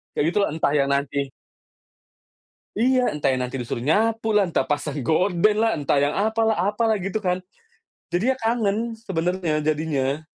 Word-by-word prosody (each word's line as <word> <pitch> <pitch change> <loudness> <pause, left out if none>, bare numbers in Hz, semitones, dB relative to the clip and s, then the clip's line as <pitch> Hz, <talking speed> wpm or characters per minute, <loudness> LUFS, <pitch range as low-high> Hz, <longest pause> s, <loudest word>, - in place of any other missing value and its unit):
Kayak - - +1
gitu, - - +3
entah 155 -2 0
yang 140 -1 +2
nanti. 140 -1 -1 1.5
Iya. 255 +1 +3
Entah 150 -2 -2
yang 130 - -2
nanti 125 +1 -4
disuruh 120 0 -4
nyapu 220 +8 +1
lah, 205 -2 +3
entah 165 -5 0
pasang 145 +1 -2
gorden 180 - +2
lah, 225 0 +2
entah 145 -1 0
yang 145 +1 +1
apalah 220 +1 +1 0.2
apalah, 220 0 +1
gitu 195 +3 -2
kan. 180 -2 -1 0.7
Jadinya 240 +9 +2
kangen, 225 -3 +1 0.2
sebenarnya 180 -5 -1
jadinya. 150 -2 0
180 Hz, 150 wpm, -23 LUFS, 145-220 Hz, 1.5 s, gitu